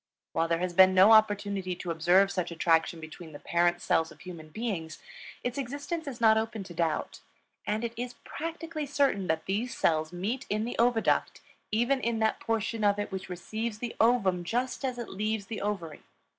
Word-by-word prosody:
While 165 0 +1
there 165 0 +1
has 180 - -5
been 190 +1 +7
no 190 +4 +8
opportunity 205 -4 +3
to 175 -1 -5
observe 175 +4 +4
such 180 -3 -2
attraction 165 0 +1
between 160 0 -10
the 145 - -9
parent 175 0 +1
cells 160 0 +1
of - - -16
human 170 -4 -9
beings, 170 -5 -4 0.5
its 245 +2 -2
existence 285 +5 -4
is 260 -3 -6
not 220 -1 +5
open 220 -2 -4
to 185 - -10
doubt. 165 -2 -1 0.5
And 210 +2 -1
it 235 -1 -3
is 245 +1 -5
practically 330 -1 -5
certain 275 -9 +1
that 160 -1 -1
these 220 +6 -2
cells 155 -1 +1
meet 200 +9 -3
in 215 +2 0
the 245 - -4
oviduct, 235 -1 +2 0.3
even 240 +5 +2
in 235 -1 0
that 220 0 +1
portion 225 0 -2
of 205 0 +3
it 205 0 -3
which 190 0 -5
receives 215 +5 -4
the 235 +1 -5
ovum 200 -7 +3
just 245 +9 -2
as 255 -2 -2
it 240 - -5
leaves 215 +1 -2
the 220 +2 -5
ovary. 190 -7 -3
205 Hz, 190 wpm, -29 LUFS, 175-235 Hz, 0.5 s, no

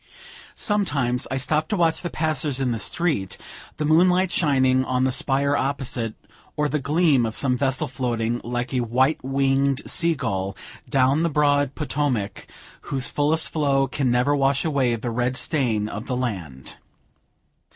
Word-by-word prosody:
Sometimes 140 - 0
I 130 - -2
stopped 150 +4 0
to 210 - 0
watch 165 -2 +1
the 175 - -3
passers 155 -4 -1
in 130 -2 0
the 115 - -2
street, 140 - -1 0.4
the 150 - -1
moonlight 180 +4 +3
shining 130 -6 +2
on 130 0 0
the 130 - +2
spire 140 +2 +1
opposite, 130 -5 -2 0.4
or 150 0 +1
the 150 +1 -1
gleam 145 -1 +2
of 110 0 -2
some 130 -2 +1
vessel 130 0 0
floating, 120 -2 -2
like 120 +2 -3
a 130 - +1
white 130 +6 +1
winged 135 +1 +1
sea 170 -1 +1
gull, 95 -6 -3 0.3
down 135 +3 +3
the 170 - +1
broad 145 -2 +2
Potomac, 140 -9 -2 0.4
whose 130 -2 0
fullest 150 +2 +2
flow 140 -3 +1
can 135 -1 -1
never 125 +4 +2
wash 135 +2 +1
away 135 -6 +1
the 115 +1 -4
red 125 +2 -1
stain 120 -11 0
of 105 +2 -7
the 125 - -2
land. 90 - -5
135 Hz, 160 wpm, -23 LUFS, 125-150 Hz, 0.4 s, moonlight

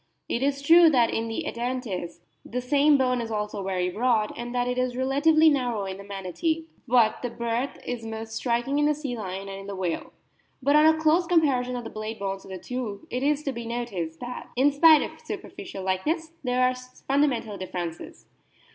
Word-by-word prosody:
It 235 - -1
is 280 0 0
true 335 +3 +8
that 245 -6 +3
in 225 0 -1
Edentates 230 -6 -4 0.2
the 250 - -4
same 285 +3 +4
bone 250 -2 +1
is 230 - -5
also 210 -2 -3
very 185 -1 -1
broad, 220 +1 +1
and 240 0 -5
that 245 0 +1
it 250 0 -1
is 255 -1 -1
relatively 295 +5 +4
narrow 245 -8 +1
in 190 0 -5
the 200 - -9
Manatee; 200 - -2 0.2
but 235 -3 +3
the 245 - -2
breadth 235 +3 -2
is 245 -2 -4
most 225 0 -6
striking 240 +4 0
in 295 - +3
the 300 0 +3
sea 285 -4 -4
lion 195 -2 -5
and 195 0 -6
in 195 - -10
the 200 - -5
whale. 180 -3 -3 0.5
But 285 +2 +2
on 305 +1 +7
a 315 0 +5
close 320 +3 +3
comparison 270 -8 +2
of 245 - -4
the 225 - -7
blade 215 +1 -5
bones 195 -1 -4
of - - -13
the 190 - -5
two 225 -2 -5
it 250 - -2
is 295 +1 +1
to 275 - -1
be 235 -2 -6
noticed 200 -9 -4
that, 245 0 -6
in 270 +4 +4
spite 310 +2 +7
of - - -8
superficial 200 - -7
like 190 +3 -1
ness, 320 0 -1
there 250 0 +1
are 255 - +1
fundamental 255 -2 -1
differences. 175 -3 -6
245 Hz, 205 wpm, -26 LUFS, 210-280 Hz, 0.5 s, true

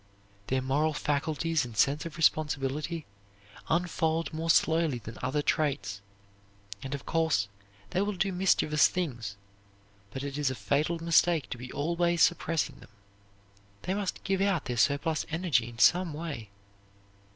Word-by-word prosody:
Their 130 0 0
moral 150 +4 +1
faculties 155 +2 0
and 120 -3 -8
sense 145 +8 +2
of 160 -2 -10
responsibility 155 0 0 0.6
unfold 165 -1 0
more 165 +1 -3
slowly 160 -4 +3
than 115 0 -9
other 145 +3 -1
traits, 135 -12 0 0.8
and 135 +1 -4
of 140 - -9
course, 160 -12 +1 0.4
they 185 - +1
will 205 0 -1
do 195 +2 0
mischievous 180 -5 +3
things; 120 - -3 0.7
but 130 +6 -6
it 140 0 -4
is 145 -3 +2
a 130 - -3
fatal 140 +11 0
mistake 165 -1 +2
to - - -3
be 125 +1 -8
always 170 +3 +1
suppressing 165 -5 +1
them. - - -15 0.9
They 185 - -1
must 200 -1 -3
give 195 0 0
out 195 -6 +1
their 125 - -2
surplus 145 +6 +2
energy 160 -9 +1
in 115 - -12
some 175 +5 +4
way. 150 -9 -6
155 Hz, 145 wpm, -29 LUFS, 135-170 Hz, 0.9 s, some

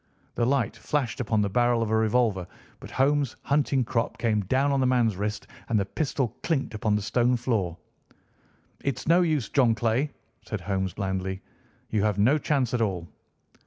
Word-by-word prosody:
The 120 - 0
light 130 -6 +1
flashed 140 -6 -2
upon 110 -3 +1
the 100 - 0
barrel 120 +1 +2
of 110 - -3
a - - +3
revolver, 110 -4 +1 0.3
but - - -10
Holmes' 140 -1 +1
hunting 140 -2 +2
crop 115 0 -1
came 110 -3 +1
down 135 +7 +2
on 140 - +2
the 130 - +3
man's 120 -5 +2
wrist, 105 +2 -3 0.2
and 110 -2 +3
the 100 - 0
pistol 135 +2 -1
clinked 150 -8 -1
upon 105 0 0
the 105 - -1
stone 125 +3 +2
floor. 110 -9 -1 1.1
"It's 140 +2 -2
no 170 +3 +5
use, 155 - +1
John 120 -5 +3
Clay," 115 +6 +1 0.3
said - - -5
Holmes 95 -2 -2
blandly. 95 -1 -3 0.5
"You 105 - +1
have 105 -1 +1
no 125 +9 +4
chance 135 -5 0
at 120 - +1
all." 90 -6 -1
115 Hz, 180 wpm, -26 LUFS, 105-135 Hz, 1.1 s, no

